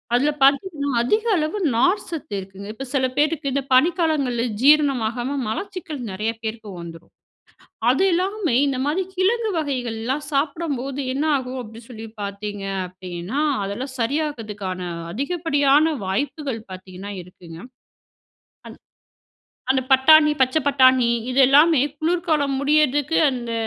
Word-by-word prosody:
அதுல 280 +5 +2
பார்த்தீங்கன்னா, 285 +1 +2
அதிக 425 - +1
அளவு 310 +5 -1 0.2
நார்சத்து 335 - 0
இருக்குங்க. 195 +1 -10
இப்ப 270 +5 -7
சில 260 -1 +2
பேருக்கு 295 -1 +1
இந்த 280 0 -1
பனிக்காலங்கள்ல 300 -5 +2 0.2
ஜீரணமாகாம 270 -3 +2
மலச்சிக்கல் 340 - -5
நிறைய 210 +4 -2
பேருக்கு 220 -1 -5
வந்துரும். 165 -1 -11 0.8
அது 265 +9 +3
இல்லாம, 375 -1 -1 0.2
இந்த 270 -2 -1
மாதிரி 315 +6 0
கிழங்கு 435 +5 +1
வகைகள்லாம் 260 -2 -3
சாப்பிடும்போது 280 -2 -2
என்ன 280 +3 -1
ஆகும் 260 -1 -4
அப்பிடி 225 -1 -11
சொல்லி 225 -2 -8 0.2
பார்த்தீங்க 200 0 -5 0.2
அப்பிடின்னா, 185 +5 -6 0.2
அதெல்லாம் 240 +7 -5
சரியாகிதுக்கான 225 -9 -3 0.3
அதிகப்படியான 290 - +2
வாய்ப்புகள் 265 +5 -3
பார்த்தீங்கன்னா 185 +2 -9
இருக்குங்க. 175 -2 -13 1.1
அன் - - -11 0.9
அந்த 265 -1 0
பட்டாணி, 300 +3 +6
பச்சை 260 +5 +2
பட்டாணி, 260 -3 +4 0.2
இது 265 - +3
எல்லாமே 295 +2 +5 0.2
குளிர்காலம் 315 -4 0
முடியிறதுக்கு 295 +1 +2
அந்த 240 -3 -5
270 Hz, 115 wpm, -22 LUFS, 225-305 Hz, 1.1 s, பட்டாணி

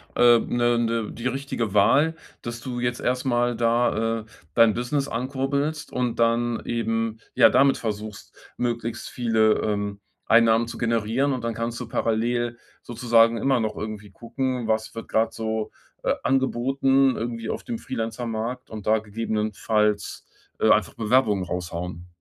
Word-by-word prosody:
äh, 120 -1 +6
ne 120 0 +1
ne 115 -2 -1
die 120 - -8
richtige 130 -5 -3
Wahl, 135 +11 +4 0.3
dass 120 0 -6
du 125 0 -5
jetzt 120 0 -1
erst 125 +1 -1
mal 120 -1 +1
da, 115 -1 +1
äh, - - -15 0.3
dein 115 -2 +5
Business 135 +4 -1
ankurbelst 140 +5 -2
und 125 -2 -2
dann 115 0 +1
eben, 115 -1 -1
ja, - - +7
damit 135 0 +4
versuchst, 105 -2 -6 0.2
möglichst 120 -1 -3
viele, 110 -3 +2
ähm, 100 -1 -2 0.3
Einnahmen 115 0 +5
zu - - -7
generieren. 115 +4 0
Und 125 -2 -4
dann 115 0 -1
kannst 115 +1 -3
du 125 - -6
parallel 120 +1 -1 0.2
sozusagen 115 -1 +3
immer 135 +2 +2
noch 110 -1 -2
irgendwie 105 -1 -6
gucken: 125 +2 -3
Was 110 0 -1
wird 115 - -7
gerade 110 0 +1
so, 110 -1 -3 0.3
äh, - - +2
angeboten, 135 +1 +2
irgendwie 115 0 -4
auf - - -4
dem 235 -3 -5
Freelancer-Markt 115 - -4
und 110 -2 -8
da 110 +1 +3
gegebenenfalls, 105 -1 -1 0.3
äh, - - +3
einfach - - +3
Bewerbungen 110 -3 +2
raushauen. 90 0 -5
115 Hz, 150 wpm, -24 LUFS, 110-125 Hz, 0.3 s, ja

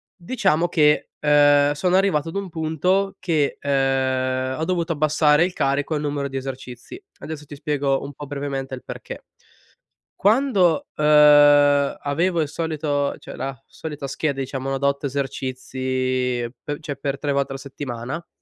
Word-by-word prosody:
diciamo 180 -4 0
che, 150 -3 +3
uhm, 145 -1 +5
sono 180 +5 +1
arrivato 175 -5 +2
ad 165 - -9
un 200 -1 -2
punto 170 +5 0
che, 155 -6 0
uhm, 130 -1 0
ho - - -1
dovuto 170 -2 -1
abbassare 150 +1 +3
il 180 - -4
carico 140 +2 0
e - - -1
numero 145 -1 -2
di 135 0 -5
esercizi. 130 - -8 0.2
Adesso 155 -1 -7
ti 145 - -9
spiego 140 -2 -1
un 140 +1 -7
po' 145 +1 -9
brevemente 140 -2 -4
il 125 - -12
perché. - - -9 0.9
Quando, 200 - +2
uhm, 150 - 0 1.0
avevo 165 +4 0
il 150 - -2
solito 150 -3 -2
cioè - - -10
la 135 -1 -4
solita 150 -3 -7
scheda 135 0 -2
diciamo 135 0 -3
da 140 +1 +1
otto 140 +1 -1
esercizi 130 -2 -2 0.2
pe 145 0 -4
cioè 145 -2 -5
per 140 0 -3
tre 145 -1 -2
volte 140 -1 0
alla 135 - -5
settimana, 140 +2 -6
145 Hz, 155 wpm, -22 LUFS, 135-160 Hz, 1.0 s, uhm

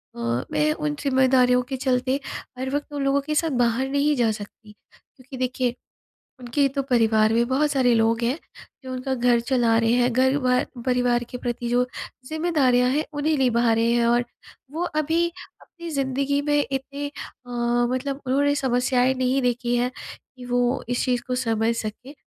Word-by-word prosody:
अ, 120 +1 -2
मैं 150 0 +2
उन 150 -1 -3
ज़िम्मेदारियों 260 -2 +3
के 265 - -3
चलते 260 +1 0 0.4
हर 260 - -2
वक़्त 290 0 -4
उन 285 -1 -2
लोगों 275 +1 +2
के 305 +2 -3
साथ 325 +1 +2
बाहर 245 +3 0
नहीं 285 +2 +2
जा 235 -4 +2
सकती। 210 +1 -9 0.5
क्योंकि 260 +1 -11
देखिए 250 -1 -1 0.6
उनके 255 +3 +1
तो 275 - +1
परिवार 220 -3 +3
में 235 +1 +2
बहुत 285 +4 +1
सारे 255 -3 +3
लोग 225 +1 +2
हैं 250 +5 0 0.5
जो 260 - -7
उनका 255 +1 -3
घर 240 -1 +3
चला 235 -2 +2
रहे 230 0 +2
हैं 245 0 +2
घर 260 +2 +3
भ 250 -1 +2 0.2
परिवार 245 -1 +1
के 250 - -6
प्रति 240 -1 -4
जो 245 +1 +2 0.4
ज़िम्मेदारियाँ 280 -5 +2
हैं 295 +4 0
उन्हें 300 +1 0
निभा 240 -3 +2
रहे 230 +1 +2
हैं। 235 -1 +2
और 240 +1 +2 0.5
वो 325 +4 -3 0.2
अभी 330 +3 +1 0.3
अपनी 340 -1 -10
ज़िंदगी 275 0 0
में 290 0 +1
इतने 275 +2 -4
अ, - - -10 0.8
मतलब 275 +2 -3
उन्होंने 285 +2 +2
समस्याएँ 250 -1 +1
नहीं 260 +1 0
देखी 245 0 0
है 250 +1 0 0.5
कि 250 - -9
वो 245 +1 0
इस 245 +2 0
चीज़ 245 -2 0
को 255 - -1
समझ 230 -2 0
सकें 235 +6 -6
255 Hz, 175 wpm, -23 LUFS, 240-275 Hz, 0.8 s, ज़िम्मेदारियों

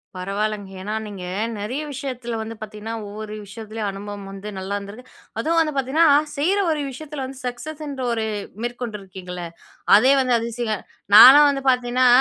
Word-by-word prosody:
பரவால்லங்க! 200 +2 -3
ஏன்னா 210 +3 -4
நீங்க 195 -3 -8 0.4
நிறைய 250 +9 -3
விஷயத்தில 250 -4 -4
வந்து 225 +1 -6
பார்த்தீங்கன்னா, 215 +1 -6
ஒவ்வொரு 210 +1 -7
விஷயத்துலயும் 215 +1 -5
அனுபவம் 200 0 -7
வந்து 195 +2 -7
நல்லா 195 +2 -3
இருந்திருக்கு. 205 +5 -10 0.3
அதுவும் 330 +6 +2
வந்து 305 -2 0
பார்த்தீங்கன்னா, 285 +5 +3 0.3
செய்ற 365 +8 +2
ஒரு 300 -2 -1
விஷயத்தில 290 0 -7
வந்து 265 0 -9
சக்சஸ் 300 +6 -6
என்ற 275 -2 -5
ஒரு 220 -1 -1 0.4
மேற்கொண்டிருக்கீங்களே! 195 -7 -6 0.5
அதே 260 +5 +5
வந்து 250 -2 +2
அதிசயம். 230 -2 -3 0.3
நாலாம் 285 +6 +11
வந்து 275 -1 -4
பார்த்தீங்கன்னா 250 0 +2
230 Hz, 150 wpm, -22 LUFS, 205-265 Hz, 0.5 s, நாலாம்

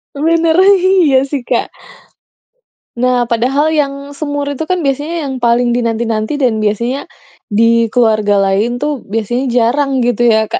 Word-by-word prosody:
Sebenarnya 330 +5 +3 0.2
iya 290 -7 +4
sih 275 -2 -4
Kak. - - -1 1.3
Nah, 245 0 +1
padahal 255 +6 +1
yang 280 -1 -3
semur 290 -1 -3
itu 285 +2 -3
kan 365 - +1
biasanya 295 +2 -2
yang 265 - -4
paling 240 0 +2
dinanti-nanti 230 +2 -2
dan 230 -5 0
biasanya 235 +6 -1 0.5
di 230 +1 +2
keluarga 215 -4 +2
lain 200 +5 0
tuh 290 -2 -3
biasanya 225 +5 -2
jarang 265 +3 +1
gitu 240 -1 0
ya 220 -2 +3
Kak? - - -3
245 Hz, 140 wpm, -14 LUFS, 230-285 Hz, 1.3 s, iya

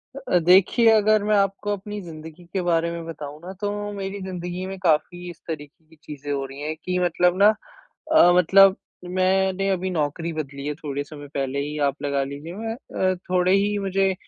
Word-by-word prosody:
अ - - -6
अ, - - +7
देखिए 190 +7 +5
अगर 215 -1 +4
मैं 210 0 +2
आपको 200 +1 0
अपनी 205 +1 -6
ज़िंदगी 160 -1 -10
के 190 - 0
बारे 170 -1 +1
में 170 -1 -6
बताऊँ 150 -2 -8
न 185 - -6
तो 205 0 -1 0.2
मेरी 200 0 -5
ज़िन्दगी 180 -1 -5
में 190 0 -6
काफ़ी 175 +1 0
इस 170 - -11
तरीक़े 155 0 -7
की 160 - -19
चीज़ें 145 -1 -7
हो 140 -1 -1
रही 135 +1 -10
है 155 +1 -2
कि 180 +3 -3
मतलब 175 0 +2
ना 205 - +8 0.7
अ 175 - +7
मतलब 190 +2 +6 0.3
मैंने 190 +1 +1
अभी 190 -1 -1
नौकरी 165 0 -2
बदली 140 -3 -6
है 150 - -1
थोड़े 145 -2 -4
समय 145 0 -11
पहले 135 0 -1
ही 145 +2 -4
आप 140 - -10
लगा 140 -1 0
लीजिए 165 +11 -6
अ, 190 -6 -2
थोड़े 180 0 +3
ही 205 +1 +2
मुझे 195 0 +1
180 Hz, 195 wpm, -23 LUFS, 150-195 Hz, 0.7 s, ना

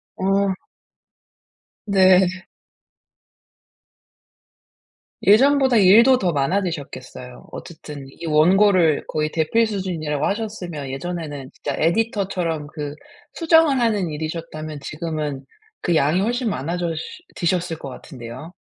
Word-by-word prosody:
어. 195 +1 +1 1.3
네. 185 -2 +4 2.8
예전보다 265 +3 +5
일도 225 +6 +7
더 180 -7 0
많아지셨겠어요. 140 -6 -3
어쨌든 150 -4 -9
이 170 - -10
원고를 170 +1 +4
거의 155 0 -1
대필 215 +9 +1
수준이라고 165 -8 -2
하셨으면 185 -9 -4
예전에는 145 -2 -5
진짜 145 - -4
에디터 200 +4 +1
처럼 165 -5 -2
그 150 -1 -6 0.4
수정을 325 -5 +4
하는 210 -7 +1
일이셨다면 155 -1 -6
지금은 150 -2 -4 0.4
그 175 - +1
양이 155 +5 +2
훨씬 240 +2 0
많아졌 170 +2 -2 0.4
지셨을 175 -1 -1
것 140 - -8
같은데요. 130 +4 -10
170 Hz, 245 characters per minute, -21 LUFS, 150-200 Hz, 2.8 s, 일도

